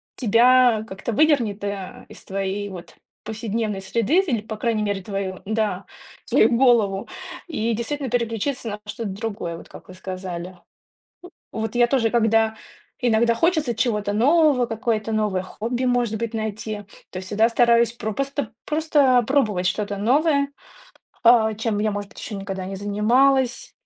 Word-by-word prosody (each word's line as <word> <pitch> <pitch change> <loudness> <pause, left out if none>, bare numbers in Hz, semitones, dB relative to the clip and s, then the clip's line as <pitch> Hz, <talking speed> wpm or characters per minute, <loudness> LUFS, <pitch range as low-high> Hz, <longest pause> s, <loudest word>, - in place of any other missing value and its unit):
тебя 240 0 +4
как-то 195 +3 -5
выдернет, 235 -8 +2
э, 200 -2 -5
из - - -13
твоей 195 +1 -3
вот 180 -3 -10 0.3
повседневной 220 -2 -3
среды 235 - +1
д 325 - -3
Или, 230 -4 0
по 215 0 -7
крайней 225 -1 0
мере, 200 -2 -2
твою, 195 -2 -4
да, 210 -3 -1 0.4
свою 220 - +4
голову 225 -6 +3 0.4
и 235 -8 -1
действительно 265 +4 -3
переключиться 235 +1 -2
на 210 0 -5
что-то 215 +1 -4
другое, 200 -4 -4
вот - - -13
как - - -13
вы 185 - -11
сказали. 185 -1 -6 1.0
В - - -4
вот 220 +1 -4
я 240 0 +4
тоже, 240 -3 +2
когда 225 -1 +2 0.5
иногда 235 0 +3
хочется 310 -1 +1
чего-то 210 -3 -1
нового, 280 +2 +4
какое-то 225 -1 -2
новое 210 -4 0
хобби, 235 +6 -3
может 245 -3 +1
быть, 230 0 -3
найти. 215 -1 -4 0.3
То 185 - -6
всегда 205 +5 +1
стараюсь 235 0 +3
пропосто 240 +2 -3
просто 295 -5 +3
пробовать 215 -9 +1
что-то 200 +2 -1
новое, 280 +6 +2 0.7
а 230 -2 +5
чем 220 -1 -1
я, 215 +1 +1
может 205 0 -5
быть, - - -13
ещё 215 - -6
никогда 195 -1 -5
не 195 +1 -5
занималась. 245 +6 +2
220 Hz, 150 wpm, -23 LUFS, 205-245 Hz, 1.0 s, а